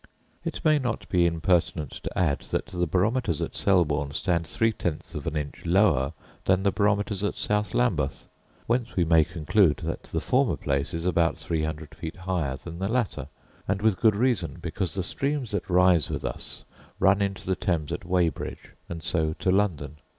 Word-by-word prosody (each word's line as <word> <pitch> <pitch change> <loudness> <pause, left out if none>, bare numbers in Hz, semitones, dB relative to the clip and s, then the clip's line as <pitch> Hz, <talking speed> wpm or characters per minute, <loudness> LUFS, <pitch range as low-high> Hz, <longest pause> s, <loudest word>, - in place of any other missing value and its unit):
It - - -5
may 155 -1 +5
not 120 -4 -3
be 90 -2 +4
impertinent 85 -3 +1
to - - -7
add, 80 -6 +2
that - - -1
the 90 -1 -2
barometers 95 - +1
at - - -3
Selborne 75 -7 +2
stand 85 +1 0
three 115 0 +1
tenths 85 -4 -4
of 75 -2 -5
an 80 - -2
inch 75 -1 -5
lower 85 -7 +3 0.3
than 95 0 +3
the 100 - +3
barometers 105 -1 +1
at 105 - -1
South 105 0 0
Lambeth; 85 - 0 0.4
whence 120 0 -1
we 90 - +2
may 80 -1 +5
conclude 80 +2 +2
that - - -3
the - - -2
former - - +2
place 70 +2 -1
is 85 +1 -4
about 85 -2 +2
three 80 -2 -2
hundred 80 0 -4
feet 80 +2 -6
higher 90 -8 -2
than 85 +5 -9
the 95 +1 -1
latter; 110 - -1 0.4
and 100 +1 -1
with 110 -4 +3
good 110 -3 +5
reason, 125 +1 0
because 95 -1 -2
the 95 - -1
streams 140 +4 -1
that 100 0 -3
rise 90 -3 +4
with - - -3
us - - -3 0.3
run 95 +1 +4
into 100 -1 -2
the 95 - +1
Thames 85 -7 -1
at - - -4
Weybridge, 90 -2 -1 0.2
and 85 -1 -6
so 80 -3 0
to 95 - 0
London. 80 -7 0
90 Hz, 185 wpm, -26 LUFS, 80-100 Hz, 0.4 s, may